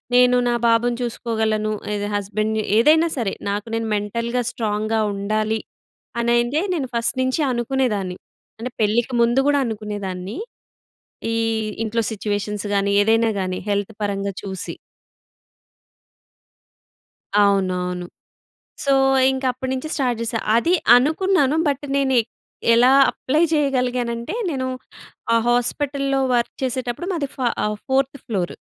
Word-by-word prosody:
నేను 250 0 +6
నా 240 - +2
బాబుని 235 +1 +2
చూసుకోగలను, 220 -2 -1 0.2
ఇదే 205 0 -3
హస్బెండ్‌ని, 215 +2 -1 0.2
ఏదైనా 315 +6 +5
సరే. 220 -5 -1 0.2
నాకు 205 +2 -3
నేను 225 0 -2
మెంటల్‌గా 235 +4 -2
స్ట్రాంగ్‌గా 215 -1 -1
ఉండాలి 215 +2 -1 0.6
అనయితే, 240 +6 +2
నేను 270 -6 -3
ఫస్ట్ 235 +3 0
నించి 260 +4 0
అనుకునేదాన్ని. 235 -7 -1 0.4
అంటే, 250 +2 -5
పెళ్ళికి 230 +4 +1
ముందు 240 +3 +3
గూడా 285 -1 +3
అనుకునేదాన్ని. 205 - -5 1.0
ఈ - - 0 0.5
ఇంట్లో 230 +1 0
సిచ్యువేషన్స్ 205 0 -3
గానీ, 200 0 +1
ఏదైనా 225 +1 +3
గానీ, 185 -1 -2
హెల్త్ 205 +2 -1
పరంగా 200 -1 -2
చూసి. 190 -2 -5 2.7
అవునవును. 180 -2 0 0.8
సో, 275 -1 +3 0.4
ఇంకప్పుడు 260 -1 -2
నించి, 265 +4 -4
స్టార్ట్ 250 -5 0
జేశా. 225 0 -1 0.2
అది 335 +10 +3 0.2
అనుకున్నాను, 310 +2 +2
బట్, 285 0 -1
నేనె 265 -3 +3 0.5
ఎలా 245 +2 +6 0.2
అప్లై 300 +6 0
చెయ్యగలిగానంటే, 250 - 0
నేను 260 -3 -2 0.7
ఆ - - +5
హాస్పటల్‌లో 275 +3 0 0.2
వర్క్ 235 -1 -1
చేసేటప్పుడు, 255 +5 -3
మాది 285 -6 -2
ఫా 255 - 0 0.2
ఆహ్, 210 0 -2
ఫోర్త్ 270 +1 +1
ఫ్లోర్. 195 -8 -2
235 Hz, 115 wpm, -21 LUFS, 210-260 Hz, 2.7 s, నేను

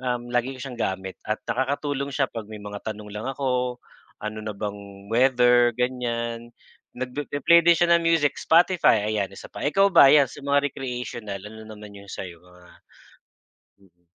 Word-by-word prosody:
um 125 -1 -3
lagi 125 +2 0
ko - - -14
siyang 125 -4 -7
gamit 95 -1 -3
at 110 - -2
nakakatulong 140 +2 -2
siya 135 -2 +1
'pag 115 -3 -7
may 105 -1 -8
mga 105 0 -7
tanong 105 -1 -6
lang 105 +4 -6
ako, 125 -2 -1 0.4
ano 105 0 -5
na 105 -1 -5
bang 100 -1 -7
weather 125 -1 +4
ganyan, 120 -2 -3 0.4
nagpipi-play 145 +6 +2
din 170 - +7
siya 170 +1 +2
ng 170 - -2
music 160 -3 +2
Spotify 165 - +3
ayan, 105 -2 0
isa - - -11
pa. - - -7
Ikaw 195 +7 +4
ba 140 - +8
'yan 145 -2 +6
sa - - -12
mga 145 0 +2
recreational 120 -6 -6
ano 110 +1 -10
naman 105 -1 -11
yung 100 - -14
sa - - -6
iyo 85 -1 -11
mga 90 0 -19 1.3
mm. 90 0 -42
120 Hz, 175 wpm, -24 LUFS, 105-135 Hz, 1.3 s, ba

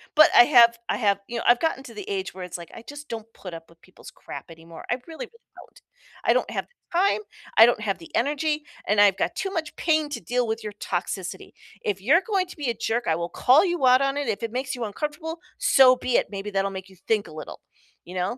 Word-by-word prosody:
but 310 0 +8
I 240 - +10
have 235 -4 +6
I - - 0
have, 200 -3 +2
you 235 0 -5
know, - - -3
I've 240 0 +6
gotten 320 -4 -1
to - - -11
the 410 0 -8
age 385 -2 -3
where 185 -1 -8
it's 180 0 -6
like, 170 - -11
I 230 - -10
just 290 0 -10
don't 225 -2 -5
put 180 -3 -10
up 165 0 -9
with 165 0 -23
people's 185 - -15
crap - - -9
anymore, 165 0 -12
I 245 - +2
really, 330 +9 -7
really, - - -29 0.3
don't. - - -16 0.4
I - - +5
don't - - 0
have - - -3
the 415 -7 -8
time, 400 +2 +2 0.4
I 225 - +10
don't 235 -2 +1
have 200 -2 -1
the 165 - -13
energy, 300 +3 0 0.2
and 210 0 +2
I've 200 -2 +5
got - - -1
too 385 - -3
much 320 -5 -4
pain 310 -2 +1
to 290 - -5
deal 245 -1 -1
with 225 +1 -3
your 210 -1 -6
toxicity. - - -4 0.3
If 200 -2 -2
you're 300 - +4
going 390 -4 +1
to 350 - -12
be 280 -5 -2
a - - +1
jerk, 230 +1 -2
I 160 - +2
will 170 +1 -3
call 280 +9 +4
you 345 -7 0
out 255 +1 +6
on 275 0 +1
it, 290 - -2
if 200 - -2
it 230 - -3
makes 255 +1 -2
you 240 -2 -3
uncomfortable, 305 - -5 0.2
so 255 -1 +6
be 250 -1 -2
it, - - +1
maybe 200 +1 -5
that'll 195 0 0
make 190 0 -7
you 190 - -17
think 215 -2 +1
a 155 - -12
little, 155 - -8 0.5
you 180 - -10
know. 185 +7 -2
240 Hz, 260 wpm, -25 LUFS, 200-300 Hz, 0.5 s, I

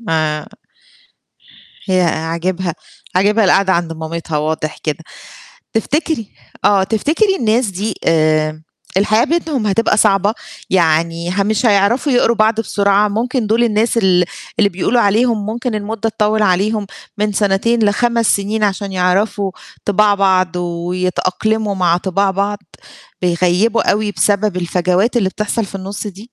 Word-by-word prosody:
ما 155 -7 -1 1.4
هي 185 -2 +2
عاجبها 170 +2 -2 0.4
عاجبها 210 +3 +3
القاعدة 190 +1 +3
عند 170 -1 -1
مامتها 160 -1 -4
واضح 155 0 -3
كده. 150 -2 -3 0.7
تفتكري 265 - -1 0.4
آه، 200 -2 +4
تفتكري 305 - +1
الناس 230 - +1
دي 200 +2 -3
آمم 155 -1 +1 0.3
الحياة 215 +4 +3
بينهم 310 -8 -1
هتبقى 215 +3 +1
صعبة؟ 205 0 +3 0.4
يعني 170 -1 +1
ه 200 +2 0
مش 215 +4 0
هيعرفوا 225 +7 +2
يقروا 235 -2 +3
بعض 220 +1 +2
بسرعة، 200 -1 +1
ممكن 235 +2 -1
دُول 230 +3 +2
الناس 225 +1 +1
ال 185 -4 +3 0.3
اللي 205 -2 +4
بيقولوا 205 +6 0
عليهم 215 0 +1
ممكن 235 +1 -3
المدّة 215 +1 -3
تطوّل 215 0 0
عليهم 205 +2 +1 0.3
من 210 0 0
سَنتين 210 +4 +1
ل5 235 +2 +1
سِنين 210 +2 -1
عشان 200 0 -2
يعرفوا 190 +2 0 0.3
طِباع 205 0 +3
بعض، 185 -3 +1
ويتأقلموا 180 +4 -1
مع 175 -2 +2
طِباع 195 +2 0
بعض، 200 +2 -2 0.6
بيغيّبوا 180 +6 +2
أوي، 210 0 0
بسبب 205 -1 +1
الفجوات 180 +6 0
اللي 205 -5 +2
بتحصل 210 +3 -2
في 195 - -12
النُص 195 +2 -6
دي؟ 205 +2 -9
200 Hz, 130 wpm, -16 LUFS, 180-220 Hz, 1.4 s, آه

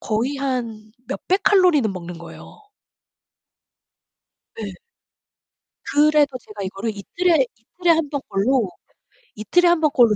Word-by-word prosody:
거의 235 +6 -1
한 235 -6 -4 0.2
몇 - - -4
백 375 +1 +2
칼로리는 350 - +4
먹는 175 -1 -7
거예요. 170 - -13 1.9
네. 460 - -6 1.1
그래도 295 -2 +3
제가 210 -3 -10
이거를 195 +4 -3
이틀에 320 - +1
이틀에 340 +10 -2
1 320 -3 +1
번꼴로 250 -5 0 0.7
이틀에 350 - +2
1 345 -2 +3
번꼴로 245 -8 +4
265 Hz, 225 characters per minute, -21 LUFS, 215-320 Hz, 1.9 s, 칼로리는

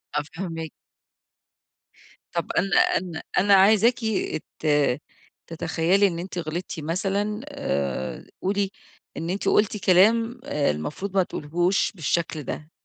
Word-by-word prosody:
آه - - +2
فاهماكِ 165 -3 -5 1.6
طب - - -2
أنا 195 - +2 0.2
أنا 170 -3 -5
أنا 200 +2 +5
عايزاكِ 215 +5 +6 0.6
ت 155 - -3 0.8
تتخيلي 170 +4 +2
إن 170 -3 -3
أنتِ 180 +1 -6
غلطتِ 170 +1 -4
مثلًا 195 +6 -1
آآ 70 - -3 0.2
قولي، 195 0 0 0.5
إن 165 - -3
أنتِ 195 +3 -2
قلتِ 210 0 +3
كلام 225 +6 +4
المفروض 150 - -2
ما 190 - +5
تقوليهوش 175 +5 0
بالشكل 165 -3 -1
ده، 150 +3 -6
180 Hz, 110 wpm, -25 LUFS, 160-200 Hz, 1.6 s, عايزاكِ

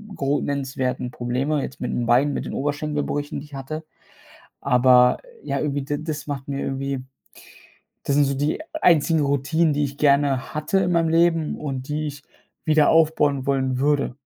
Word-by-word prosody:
gro 140 +1 0
nennenswerten 130 -3 -2
Probleme 130 +5 -1
jetzt 130 - -7
mit 125 - -2
'n 120 - -1
Beinen, 130 +5 +3
mit - - -3
den - - -6
Oberschenkelbrüchen, 145 +1 -2
die 145 - -10
ich 145 - -20
hatte. 155 +4 -6 0.8
Aber, 125 -1 +5 0.3
ja, - - -2
irgendwie 145 -2 -1
d 145 +2 -3
das 155 -2 -5
macht 140 -2 -5
mir 140 -1 -3
irgendwie 135 -1 -3 1.0
das 140 - 0
sind 145 - +4
so 140 0 -1
die 145 - -1 0.2
einzigen 160 -1 +4
Routinen, 145 +3 +1
die 145 +1 0
ich 140 0 -7
gerne 140 -2 +2
hatte 155 +6 +1
in 180 -2 +1
meinem 165 -1 +2
Leben 165 -1 +2
und 135 -3 -5
die 150 +1 -2
ich 145 0 -8 0.4
wieder 155 -1 +4
aufbauen 150 -4 +3
wollen 130 -2 0
würde. 140 -2 +1
145 Hz, 170 wpm, -23 LUFS, 135-150 Hz, 1.0 s, Aber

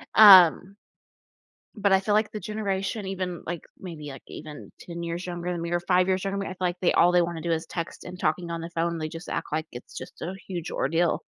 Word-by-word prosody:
Um, 190 -2 +8 1.0
but 200 -2 +1
I 190 - +5
feel 205 +1 0
like 215 +1 +2
the 215 - -5
generation 200 0 -3
even, 185 -3 -4
like, 170 -1 -4 0.2
maybe, 160 -5 -8
like 135 - -10
even 150 -1 -9
10 170 -1 -7
years 170 +1 -4
younger 175 0 -4
than 170 -1 -4
me 170 - -4
or 175 0 +1
5 180 +1 +2
years 185 0 +1
younger, 195 0 -2
I - - -5
feel 185 - -7
like 175 0 -6
they 180 - +3
all 175 - +5
they 180 0 +5
wanna 170 -1 -3
do 170 +1 -1
is 160 0 -1
text 170 -2 -6
and 180 - -8
talking 170 +1 -1
on 170 0 -3
the 165 +1 -6
phone 170 0 -1
they 155 -1 -3
just 165 +2 -9
act - - -3
like 155 +1 -1
it's 120 - -10
just - - -9
a 180 +4 -4
huge 175 -3 -5
ordeal. 165 +4 0
175 Hz, 235 wpm, -26 LUFS, 170-190 Hz, 1.0 s, Um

